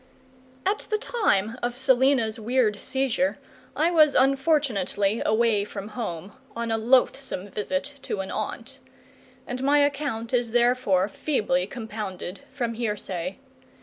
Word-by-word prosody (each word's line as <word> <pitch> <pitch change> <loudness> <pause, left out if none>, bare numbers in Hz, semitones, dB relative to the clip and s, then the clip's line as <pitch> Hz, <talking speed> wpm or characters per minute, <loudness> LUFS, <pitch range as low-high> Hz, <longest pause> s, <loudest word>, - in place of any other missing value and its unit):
At 405 +2 0
the 430 - +1
time 240 - 0
of 240 0 -2
Selina's 260 -3 +3
weird 225 -2 +1
seizure 270 +1 0 0.4
I 325 +3 +2
was 310 -4 +5
unfortunately 260 - +2
away 220 -1 +2
from 205 0 -7
home, 205 -5 -5 0.2
on 230 0 -2
a 225 - +2
loathsome 245 -3 +1
visit 280 +8 -3
to 200 - -3
an 190 - -6
aunt; 235 +5 -5 0.7
and 250 +1 -4
my 285 +2 +4
account 280 -5 0
is 240 -2 +1
therefore 240 -6 +3
feebly 205 - 0
compounded 210 -6 -6
from 240 -4 -2
hearsay. 200 -5 -3
235 Hz, 125 wpm, -25 LUFS, 210-270 Hz, 0.7 s, was